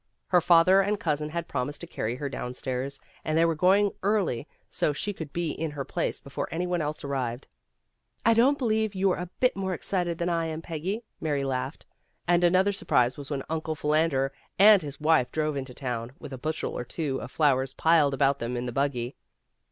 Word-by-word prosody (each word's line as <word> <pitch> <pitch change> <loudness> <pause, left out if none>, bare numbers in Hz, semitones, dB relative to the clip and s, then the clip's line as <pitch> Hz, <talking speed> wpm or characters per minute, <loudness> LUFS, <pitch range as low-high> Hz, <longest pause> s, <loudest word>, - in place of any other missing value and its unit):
Her 180 -2 +5
father 175 +3 +6
and 205 +1 0
cousin 150 -3 -1
had 170 +1 -4
promised 140 +1 -3
to - - -5
carry 120 -8 -3
her 140 +2 -4
downstairs, 130 +1 -4 0.2
and 155 0 0
they 165 - +5
were 165 - +2
going 195 +5 +4
early 190 - 0 0.2
so 150 - 0
she 205 +8 -3
could 160 -6 -7
be 170 -1 -1
in 160 0 -3
her 145 -2 -5
place - - -2
before 140 - -5
any 175 +2 -1
one 175 -1 0
else 150 0 -3
arrived. 130 -3 -3 0.8
"I 230 - +6
don't 255 +5 +4
believe 220 -5 0
you're 190 -1 +2
a 180 -1 -5
bit 250 - +3
more 190 -1 -2
excited 175 -2 -1
than 170 - -1
I 165 -2 0
am, 160 0 -5
Peggy," 180 +8 -3 0.2
Mary 145 -3 -1
laughed. 130 +1 -3 0.4
And 175 0 +3
another 185 +3 +4
surprise 125 -10 +2
was 140 -2 -8
when 140 -3 -2
Uncle 160 0 -2
Philander 150 -3 +1 0.2
and 205 0 +8
his 145 -2 -7
wife 155 -4 +3
drove 155 -1 -1
into 130 -2 -5
town, 120 -1 -4
with 135 - -9
a - - -5
bushel 155 +3 -3
or - - -3
two 135 +1 -3
of - - -7
flowers 135 -3 +1
piled 155 -4 +4
about 140 0 +2
them 120 +1 -3
in 120 - -3
the 120 - -3
buggy. 125 -1 -1
155 Hz, 205 wpm, -27 LUFS, 135-180 Hz, 0.8 s, and